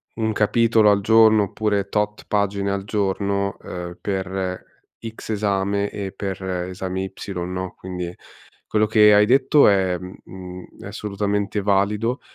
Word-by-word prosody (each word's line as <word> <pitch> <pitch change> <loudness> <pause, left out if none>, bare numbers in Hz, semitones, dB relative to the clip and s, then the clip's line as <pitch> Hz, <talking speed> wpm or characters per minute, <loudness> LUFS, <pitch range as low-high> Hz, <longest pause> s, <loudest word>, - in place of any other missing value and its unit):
un 110 -1 -1
capitolo 110 0 +3
al 100 - +3
giorno, 110 0 +5
oppure 100 0 -1
tot 105 0 -2
pagine 100 -1 0
al 100 -1 -2
giorno, 100 -1 -1
uhm, 90 -1 -7
per 95 -1 -3 0.4
X 115 -1 -9
esame 100 -1 0
e 100 -2 -5
per 95 -1 -5
esami 95 +1 -3
Y, 95 +1 -8
no, 90 0 -5
quindi 90 -1 -6 0.5
quello 110 0 +2
che 105 -1 +6
hai 105 0 +6
detto 135 +4 +5
è 95 -3 +2
mhmm, 90 +1 -10
mhmm, 90 -1 -9 0.2
è - - -8
assolutamente 105 0 -2
valido. 105 +5 +1
100 Hz, 140 wpm, -22 LUFS, 95-105 Hz, 0.5 s, che